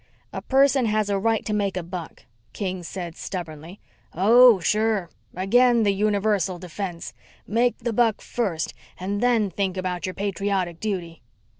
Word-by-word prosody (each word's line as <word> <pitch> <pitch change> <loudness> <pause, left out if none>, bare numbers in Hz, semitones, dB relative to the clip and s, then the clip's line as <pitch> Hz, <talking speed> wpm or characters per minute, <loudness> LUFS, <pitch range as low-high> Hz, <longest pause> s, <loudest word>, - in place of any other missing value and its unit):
"A - - -4
person 270 -2 +3
has 215 -1 0
a 200 - +1
right 225 +2 0
to 210 - -2
make 200 -2 -1
a 180 - -3
buck," 170 -2 -8 0.3
King 185 -2 -3
said 170 -1 -6
stubbornly. 170 0 -7 0.4
"Oh, 230 +4 +7
sure. 210 0 0 0.2
Again 235 +5 +4
the 200 -1 +3
universal 200 -2 +1
defense. 180 0 -6 0.3
Make 240 +3 +1
the 235 -1 -3
buck 225 -1 +2
first 190 -10 -3 0.3
and 200 +3 -3
then 230 -5 +2
think 190 +1 -2
about 180 -2 -3
your 185 - -5
patriotic 195 -3 -2
duty." 180 -6 -4
200 Hz, 150 wpm, -24 LUFS, 180-220 Hz, 0.4 s, Oh